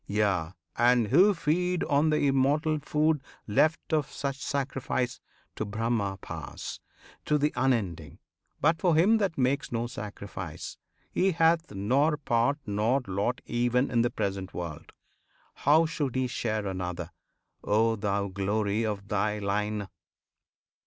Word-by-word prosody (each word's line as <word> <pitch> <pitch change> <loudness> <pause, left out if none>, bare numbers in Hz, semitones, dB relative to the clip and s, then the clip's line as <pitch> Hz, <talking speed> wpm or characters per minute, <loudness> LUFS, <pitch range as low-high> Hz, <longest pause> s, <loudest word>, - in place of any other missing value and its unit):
Yea! 100 -6 +1 0.3
and 120 -2 +4
who 185 +10 +6
feed 180 0 0
on 145 +2 +2
the 150 -1 +2
immortal 145 +3 +2
food 150 0 +1 0.2
Left 155 +10 +3
of 150 -3 +1
such 140 -1 -3
sacrifice, 135 -3 -2 0.4
to - - -2
Brahma 110 -2 -1
pass, - - -7 0.5
To 150 - +3
The 150 +1 +1
Unending. 100 - -1 0.4
But 160 +3 +2
for 175 -4 +3
him 205 +8 +5
that 195 -5 0
makes 135 +2 +1
No 115 0 -1
sacrifice, 100 -7 -7 0.3
he 190 0 +2
hath 165 +1 +3
nor 135 +10 +2
part 120 0 +1
nor 110 +6 +1
lot 100 +6 -1
Even 120 +2 +1
in 120 - +3
the 120 - +2
present 95 -3 -3
world. 85 -4 -6 0.6
How 155 +3 +4
should 150 -5 -2
he 130 0 +1
share 110 -4 -2
Another, 90 -2 -4 0.5
O 115 +2 +2
thou 100 -1 -1
Glory 100 +3 0
of 100 -2 -3
thy 105 0 0
Line? 105 0 -1
120 Hz, 135 wpm, -28 LUFS, 100-150 Hz, 0.6 s, who